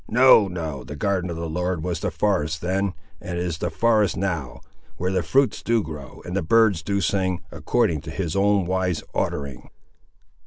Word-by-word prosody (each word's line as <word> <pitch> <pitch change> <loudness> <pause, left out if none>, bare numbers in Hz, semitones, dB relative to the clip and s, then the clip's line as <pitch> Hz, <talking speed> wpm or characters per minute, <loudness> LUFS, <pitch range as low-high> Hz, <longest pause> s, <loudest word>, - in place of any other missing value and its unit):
No, 120 -3 +6
no, 80 -7 -5
the 65 +4 -8
garden 95 +1 -1
of 85 - -4
the 85 0 -4
Lord 90 0 -2
was 85 -2 -2
the - - -1
forest 80 -6 0
then, 95 +1 -1 0.3
and 90 -1 -5
is 85 -2 -2
the 85 - -1
forest 105 +1 +2
now, 85 -9 -3 0.4
where 90 +2 -1
the 95 -1 +1
fruits 130 +11 +2
do 115 -2 +1
grow, 75 -5 -9
and - - -5
the - - +1
birds 105 0 +3
do 100 +3 -1
sing, 95 -3 0
according 80 -4 0
to - - -9
his 80 +1 -3
own 100 -1 +3
wise 90 -2 -1
ordering. 70 -3 -3
90 Hz, 185 wpm, -23 LUFS, 80-100 Hz, 0.4 s, No